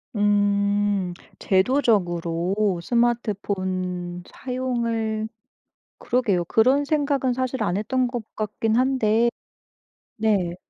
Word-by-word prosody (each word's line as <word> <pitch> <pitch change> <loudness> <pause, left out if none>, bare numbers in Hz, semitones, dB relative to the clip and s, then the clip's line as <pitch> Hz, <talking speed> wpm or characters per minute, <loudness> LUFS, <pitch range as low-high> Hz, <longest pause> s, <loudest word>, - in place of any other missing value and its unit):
음. 205 -2 +1 0.3
제도적으로 190 -4 +1
스마트폰 185 -6 -1
사용을 235 -4 -2 0.7
그러게요. 210 -8 +1
그런 255 +9 +3
생각은 280 -3 +1
사실 260 +1 -2
안 175 - 0
했던 255 +5 0
것 240 -1 -4
같긴 215 +1 -1
한데. 235 -3 +2 0.9
네. 200 -6 +1
215 Hz, 185 characters per minute, -24 LUFS, 190-245 Hz, 0.9 s, 그런